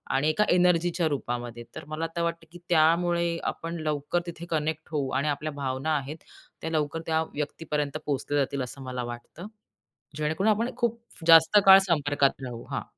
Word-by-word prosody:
आणि 150 +3 +2
एका 210 +7 +2
एनर्जीच्या 175 -1 +3
रूपामध्ये. 120 -4 -4
तर - - -8
मला 155 +2 -3
तर 170 - -1
वाटतं, 170 -1 -3
की 175 - -12
त्यामुळे 170 +1 +3
आपण 165 +1 -4
लवकर 150 +2 -1
तिथे 170 0 -7
कनेक्ट 155 0 -2
होऊ 140 -3 -1
आणि 150 - -1
आपल्या 150 +1 -2
भावना 140 +2 -2
आहेत 145 +3 -6 0.4
त्या 160 - -3
लवकर 155 +1 -1
त्या 160 0 +1
व्यक्तीपर्यंत 150 -1 -3
पोहोचल्या 145 0 -1
जातील 135 0 -4
असं 135 +2 -8
मला 125 -1 -4
वाटतं 120 - -8 0.7
जेणेकरून 160 +8 0
आपण 230 +4 0
खूप 235 -1 0 0.3
जास्त 165 +5 +7
काळ 195 0 +10
संपर्कात 145 -3 +1
राहू. 120 -2 -6
हां. - - -2
155 Hz, 165 wpm, -27 LUFS, 140-170 Hz, 0.7 s, काळ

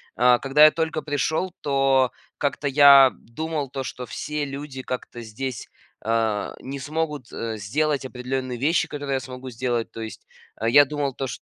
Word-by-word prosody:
А, 125 0 +5
когда 140 +2 +4
я 155 - +9
только 160 -1 -2
пришел, 155 +5 -1
то 135 -2 +2 0.3
как-то 145 0 -1
я 140 -1 +8
думал 150 +3 -5
то, 135 0 -4
что 125 0 -6
все 150 +6 -4
люди 140 -1 -7
как-то 125 -2 -6
здесь, 115 +2 -6 0.4
а, 110 -2 0
не 135 +1 -6
смогут, 150 -2 -3
э, 115 -1 -4
сделать 140 +7 -1
определенные 130 0 -4
вещи, 155 +6 +2
которые 145 -2 -3
я - - 0
смогу 130 +1 -8
сделать. 120 -1 -2
То 115 - -8
есть, 110 -1 -8 0.3
э, 115 - +2
я 145 +4 +7
думал 145 -1 -2
то, 135 - -3
чт 125 - -6
135 Hz, 170 wpm, -24 LUFS, 125-145 Hz, 0.4 s, я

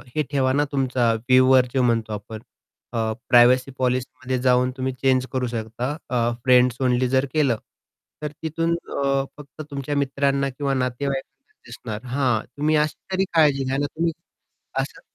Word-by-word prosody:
हे 155 - +2
ठेवा 130 -2 +2
ना 145 - +2
तुमचा 130 -4 +1
व्ह्यूवर 130 +2 +4
जो 130 - +2
म्हणतो 115 -3 +1
आपण 105 +1 -7 0.5
अ, 110 -1 0 0.2
प्रायव्हसी 125 +2 +5
पॉलिसीमध्ये 130 0 -1
जाऊन 125 0 +3
तुम्ही 130 0 -2
चेंज 130 0 +1
करू 130 -1 -1
शकता. 120 +4 -4
अ, 125 - -2 0.3
फ्रेंड्स 125 -1 +5
ओनली 125 0 +2
जर 130 +1 +2
केलं, 140 -7 +2 0.6
तर 150 -1 -3
तिथून 165 +1 0
अ, 140 -4 -1
फक्त 150 +1 -11
तुमच्या 140 +1 -3
मित्रांना 140 0 +1
किंवा 135 +1 -2
नातेवाईकांनाच 135 +1 -3
दिसणार. 115 -1 -7
हां. 125 -3 +1 0.2
तुम्ही 155 +2 +2
अशी 150 0 +1 0.2
तरी 190 +1 +2
काळजी 145 -4 +4
घ्या 130 +1 -1
ना 145 - 0
तुम्ही 165 +3 -1 0.7
असं, - - -4
130 Hz, 155 wpm, -23 LUFS, 125-140 Hz, 0.7 s, प्रायव्हसी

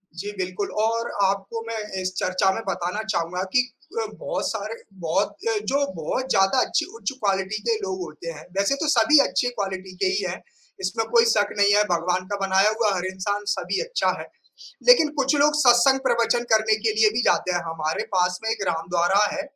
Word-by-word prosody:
जी, 200 +4 -5
बिल्कुल 185 +2 -3
और 230 +1 0 0.2
आपको 195 +4 -2
मैं 230 -1 -4 0.2
इस 185 0 -3
चर्चा 185 +1 +1
में 225 - -4
बताना 185 +5 -2
चाहूँगा 180 -3 -2
कि 250 - +5 0.4
अ, - - -1
बहुत - - -2
सारे 220 0 -4 0.2
बहुत 175 - -1
अ, 430 - +1
जो 280 +1 +1 0.2
बहुत 260 +12 -2
ज़्यादा 195 +7 +3
अच्छी 320 - 0
उच्च 295 - -3
क्वालिटी 195 +1 0
के 230 -1 +1
लोग 190 -2 -4
होते 165 0 -7
हैं। 155 - -11
वैसे 200 +7 +2
तो 310 - -1
सभी 285 +3 +5
अच्छी 245 - 0
क्वालिटी 190 -4 -5
के - - +4
ही 390 +2 0
हैं। - - -8 0.4
इसमें - - -1
कोई 465 -1 +5
शक 205 - +3
नहीं 205 0 +4
है 210 - +5
भगवान 180 +2 0
का 205 - -2
बनाया 195 +2 +4
हुआ 220 -2 +1
हर 180 0 -3
इंसान 205 +2 -3
सभी 185 +3 -2
अच्छा - - 0
है। - - -8 0.6
लेकिन 485 -12 +7
कुछ 270 +2 +2
लोग 295 +1 +3
सत्संग 250 +1 +5
प्रवचन 235 +1 +1
करने 220 0 +4
के 220 - +3
लिए 215 -1 +6
भी 235 +2 0
जाते 180 - +2
हैं, 175 - 0
हमारे 160 -1 -2
पास 180 0 +1
में 220 - 0
एक 215 - -2
राम 165 +1 -2
द्वारा 180 +4 +3
है। 290 - -3
205 Hz, 200 wpm, -23 LUFS, 185-240 Hz, 0.6 s, लेकिन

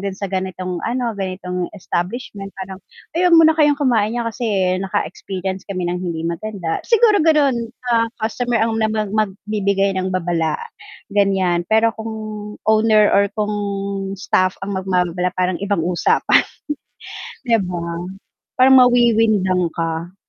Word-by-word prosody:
dun 195 -1 -3
sa 200 -2 -5
ganitong 185 -1 -3
ano, 240 -1 -1
ganitong 180 -2 -3
establishment 195 +2 -4
parang, 190 0 -7 0.3
"Ay 355 +2 +2
'wag 335 - +5
muna 320 -1 +7
kayong 295 -1 +5
kumain 235 -6 +1
n'yan 240 - 0
kasi 240 - -4 0.3
naka-experience 190 +1 -4
kami 185 -2 -3
nang 175 +1 -1
hindi 170 -3 -3
maganda." 170 0 -3
Siguro 450 -3 +4
ganun, 280 -7 +2 0.2
ah, 230 0 +3 0.2
customer 240 +2 -1
ang 225 0 0
na 220 - +3
mag 215 -2 -2
magbibigay 200 -1 0
ng 185 - -1
babala 165 -3 0 0.6
ganyan, 190 -4 +1
pero 220 +1 +4
kung 220 0 -5 0.5
owner 215 -1 +4
or 200 - +4
kung 210 0 -1 0.6
staff 185 -3 +1
ang 200 - -4
magbababala, 180 -1 0
parang 180 -1 0
ibang 200 -4 0
usapan. 175 -1 +3 1.0
'Di 235 -3 +3
ba. 175 -2 -4 0.7
Parang 260 +1 +6
mawiwindang 225 -7 +3
ka. 165 +2 -3
200 Hz, 135 wpm, -19 LUFS, 185-230 Hz, 1.0 s, muna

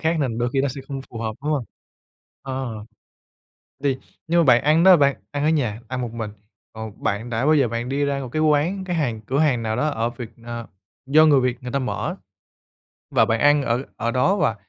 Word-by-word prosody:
khác 165 +1 +1
nên 120 -5 -1
đôi 120 0 0
khi 135 - +2
nó 140 - +1
sẽ 135 +1 -6
không 135 -1 -4
phù 115 - -7
hợp, 110 -1 -2
đúng 150 - 0
hông? 140 -6 -1 0.8
Ờ. 130 -5 -5 1.0
Thì 135 -2 +2 0.3
nhưng 170 +1 +3
mà - - +4
bạn 125 -4 +5
ăn 155 +3 +4
đó 190 -1 +9
bạn 140 -3 +3
ăn 145 0 -2
ở - - +3
nhà, 125 -9 0
ăn 130 +1 -3
một 120 -2 -4
mình, 115 -2 -4 0.4
còn 110 -2 -9
bạn 105 +4 -2
đã 115 +3 0
bao 155 - +5
giờ 140 -5 +3
bạn 115 +2 -3
đi 140 +2 0
ra 140 -1 -1
một 130 - -5
cái 155 +5 -1
quán 155 +6 +2
cái 180 -2 -2
hàng, 120 -9 -1
cửa 130 +6 -2
hàng 140 -6 +2
nào 110 -1 -1
đó 145 - +1
ở 115 -5 -1
Việt 120 -2 -8
Na 120 0 -7 0.4
do 155 +3 +6
người 145 -3 +5
Việt 125 -1 -1
người 125 0 -6
ta 140 - +1
mở. 130 - -3 1.0
Và - - +4
bạn 110 0 0
ăn 145 +2 +5
ở 125 -1 0
ở 115 - -1
đó 130 +11 +2
và, 115 - +1
130 Hz, 235 wpm, -22 LUFS, 115-150 Hz, 1.0 s, đó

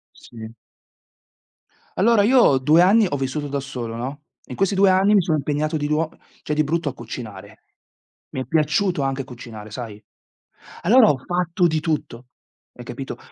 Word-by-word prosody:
Sì. 110 -2 -11 1.4
Allora, 215 +2 +4
io, 235 - +5
2 150 +6 +4
anni, 205 +5 +5
ho 145 - -2
vissuto 135 +2 -3
da 140 0 -2
solo, 120 -4 -6
no, 135 +5 -6 0.2
in 125 - -8
questi 195 0 +1
2 195 0 +4
anni, 190 +3 +4
mi 200 - +6
sono 160 -2 0
impegnato 150 +2 -1
di 145 -1 -2
nuo 155 +1 0 0.3
cioè, 150 - -2
di 155 0 +1
brutto, 165 +1 -1
a 135 - -6
cucinare. 110 -4 -9 0.7
Mi 130 - -5
è - - -10
piaciuto 160 +1 +1
anche 135 0 -2
cucinare, 115 -4 -10
sai? 110 -2 -8 0.8
Allora, 230 +5 +6
ho 140 - +2
fatto 175 +3 0
di 160 -1 0
tutto, 150 -6 -4 0.5
hai 120 - -11
capito? 130 +3 -7
150 Hz, 165 wpm, -22 LUFS, 125-175 Hz, 1.4 s, mi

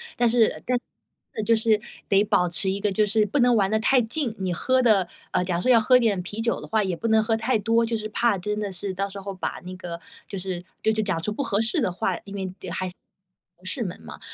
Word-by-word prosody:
但 240 -1 +3
是 230 -1 +2
但， 250 0 +2 0.7
就 230 +2 +4
是 220 -1 +2 0.3
得 200 0 +5
保 180 -3 +2
持 175 +3 +1
一 195 +1 -1
个 205 0 0
就 210 +2 +2
是 215 +1 +2
不 220 +8 -1
能 245 -1 +5
玩 195 -2 +2
得 220 - +2
太 255 +4 +4
近。 235 0 -2
你 185 -2 -1
喝 255 +8 +2
的 205 -6 +4 0.2
呃， - - +1
假 180 -1 -1
如 175 - -1
说 255 - +4
要 235 - +7
喝 250 +3 +5
点 220 -6 +1
啤 205 +5 -6
酒 230 0 0
的 - - -9
话， 220 -1 +1
也 185 -3 -1
不 230 - -3
能 220 -1 +4
喝 225 0 +1
太 225 +2 +1
多， 230 +2 +2
就 230 0 0
是 215 0 -4
怕 230 -1 +1
真 210 +3 -3
的 205 -2 -3
是 190 +1 -4
到 195 +2 -2
时 200 0 -8
候 195 0 -6
把 185 - -4
那 185 +1 -6
个 175 -2 -7 0.3
就 200 - -6
是 185 -1 -4 0.2
就 220 - +3
就 220 0 +1
讲 190 -6 0
出 210 - 0
不 250 - -3
合 205 -7 0
适 230 +8 +1
的 185 - +1
话， 180 0 -2
因 200 0 -8
为 190 -2 -4 0.2
还 185 - -2
是 - - -11 0.6
同 180 - -22
事 245 +7 -4
们 180 - -5
嘛。 75 -3 -10
210 Hz, 290 characters per minute, -25 LUFS, 190-225 Hz, 0.7 s, 要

